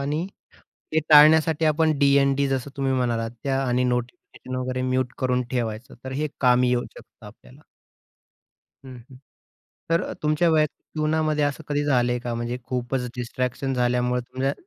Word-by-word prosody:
आणि 150 +5 -2 0.7
ते 160 - +3
टाळण्यासाठी 155 +1 +6
आपण 155 -1 +2
डी-एन-डी 140 -1 +3
जसं 135 +1 -2
तुम्ही 135 -1 0
म्हणालात 115 -3 -1
त्या 135 -1 0
आणि 125 +1 +1
नोटिफिकेशन 125 +1 -4
वगैरे 130 0 -3
म्युट 130 -1 -1
करून 125 -1 0
ठेवायचं, 120 0 -3
तर 130 - -5
हे 150 +3 -2
कामी 125 -1 +4
येऊ 125 0 +1
शकतं 110 - -15
आपल्याला. 125 +7 -16 1.2
हं, 130 -1 -10
हं. 130 - -13 0.7
तर 165 0 +3
अ, - - -5
तुमच्या 155 +3 +2
वैयक्तीक 155 -2 0
जीवनामध्ये 155 -1 +1
असं 145 +2 -3
कधी 145 0 0
झालंय 125 -3 +1
का 120 -1 -4
म्हणजे 120 +1 -3
खूपच 125 0 -2
डिस्ट्रॅक्शन 125 +2 -3
झाल्यामुळे 125 0 +1
तुमच्या 130 +3 -2
130 Hz, 150 wpm, -24 LUFS, 125-150 Hz, 1.2 s, टाळण्यासाठी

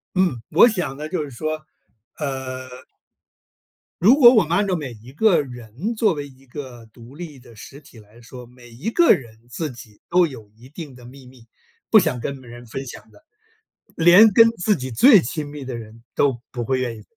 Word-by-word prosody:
嗯， 175 -11 +1
我 185 +9 +7
想 180 - -2
呢， 150 +1 -6
就 155 -2 -3
是 145 - -8
说， 155 +4 -5 0.5
呃 130 -3 -5 1.3
如 230 - +6
果 245 -3 +8
我 220 -5 +5
们 170 +3 0
按 205 - +1
照 185 -3 -1
每 140 -6 -6
一 115 +3 -15
个 180 +3 +3
人 125 - -6
作 215 -4 +1
为 145 -2 -6
一 135 -1 -18
个 125 -3 -10
独 115 +4 -16
立 155 -4 -9
的 120 -2 -17
实 140 +7 -12
体 130 -6 -17
来 105 +3 -19
说， 125 +1 -12
每 120 0 -17
一 125 - -5
个 345 +4 +3
人 115 -4 -1
自 155 +5 -4
己 120 -5 -14
都 180 0 +4
有 115 -9 -10
一 120 +3 -17
定 150 -3 -10
的 125 - -15
秘 130 +1 -14
密， 125 -3 -18 0.4
不 220 - +7
想 125 - -1
跟 140 +2 -5
别 125 -2 -15
人 120 +1 -12
分 135 +4 -7
享 - - -11
的， 310 - -22 0.7
连 180 +6 +7
跟 230 +3 +7
自 210 0 0
己 130 -1 -6
最 230 - +7
亲 150 +3 -5
密 145 -2 -8
的 130 -1 -6
人 115 0 -12
都 135 -4 +1
不 120 -2 -4
会 130 +3 -1
愿 120 -3 -3
意 110 - -13
135 Hz, 225 characters per minute, -21 LUFS, 120-175 Hz, 1.3 s, 果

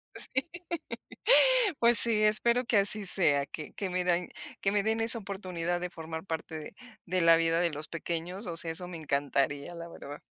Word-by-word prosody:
Sí. 265 +4 0 1.3
Pues 235 0 +5
sí, 220 -1 +8
espero 235 +3 +1
que 230 - 0
así 200 +1 +4
sea, 145 -7 +4
que 150 +2 -10
que 195 -2 -6
mi 180 0 -3
dain 175 0 -1 0.3
que 195 - -1
me 205 -1 0
den 220 +1 -2
esa 230 +1 +3
oportunidad 180 -4 -5
de 180 0 -6
formar 160 0 -9
parte 160 -2 -7
de 150 - -12 0.3
de 185 0 -2
la 165 0 +4
vida 165 0 0
de 170 -2 0
los 150 +1 -4
pequeños, 170 +4 -6
o 170 -1 -5
sea, 165 0 -1
eso 175 +2 -4
me 175 - -9
encantaría, 145 +1 -3
la 170 0 -9
verdad. 145 -3 -12
175 Hz, 190 wpm, -27 LUFS, 160-200 Hz, 1.3 s, sí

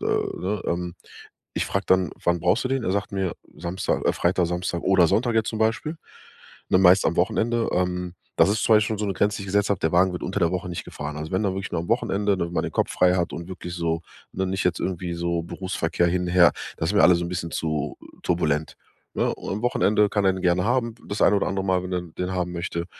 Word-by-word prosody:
ne? 100 +2 -1
Ähm, 85 0 -2 0.6
ich - - 0
frag 95 +1 -2
dann: 95 -3 +3
„Wann 85 0 +2
brauchst 90 +9 +2
du - - 0
den?“ 135 -1 0
Er - - 0
sagt 100 0 -2
mir 95 -3 -1 0.2
„Samstag, 85 +3 -2
äh, - - +4
Freitag, 90 0 +1
Samstag 90 0 -2
oder 95 -3 +4
Sonntag“ 115 +5 +1
jetzt 110 -1 +2
zum 110 - -4
Beispiel, 115 +9 0 0.7
ne, 95 - +5
meist 95 +1 +6
am 80 - +1
Wochenende. 115 +6 +1
Ähm, 90 -1 -1 0.2
das - - +5
ist 110 +2 0
zwar 110 - +5
jetzt 105 - +1
schon 110 -2 -2
so 105 - -1
'ne 100 - 0
Grenze, 100 +4 +1
die - - -6
ich - - -7
gesetzt 100 +1 +1
hab, 100 - +1
der 80 - 0
Wagen 90 +2 +4
wird 90 - -5
unter 95 +3 -2
der 85 -2 +3
Woche 90 0 -3
nicht 85 - -5
gefahren. 75 0 -6
Also 80 +1 -6
wenn 95 - +1
dann 95 -2 0
wirklich 95 0 -4
nur 80 - 0
am 85 - -8
Wochenende, 105 -4 +1
damit 85 -1 -2
man - - 0
den - - -4
Kopf - - 0
frei 90 0 +4
hat 85 -2 -1
und 85 - -6
wirklich 90 -2 -7
so, 85 -1 -1 0.3
ne 95 0 -1
nicht 95 +1 -2
jetzt 90 -2 +1
irgendwie 90 -1 -3
so 85 0 -1
Berufsverkehr 85 -1 -1
hin, 90 +1 0
her 90 -2 +6 0.3
das 80 - -1
ist - - -2
mir 105 - +5
alle 90 - +7
so 85 - -2
'n - - -4
bisschen 85 -1 -4
zu 75 -2 -2 0.3
turbulent, 80 -3 0 0.4
ne? - - +1
Und - - -6
am 105 +3 -4
Wochenende 105 -3 +3
kann 105 -1 0
er 95 - +4
den 95 - -6
gerne 90 0 +2
haben, 115 0 0
das 100 - -2
ein 105 - +5
oder 100 - +1
andere 95 0 -2
Mal, 95 -1 +2
wenn 90 - -5
er 90 -1 -1
den 90 +2 -5
haben 90 -1 -1
möchte. 85 0 -3
90 Hz, 255 wpm, -24 LUFS, 85-100 Hz, 0.7 s, alle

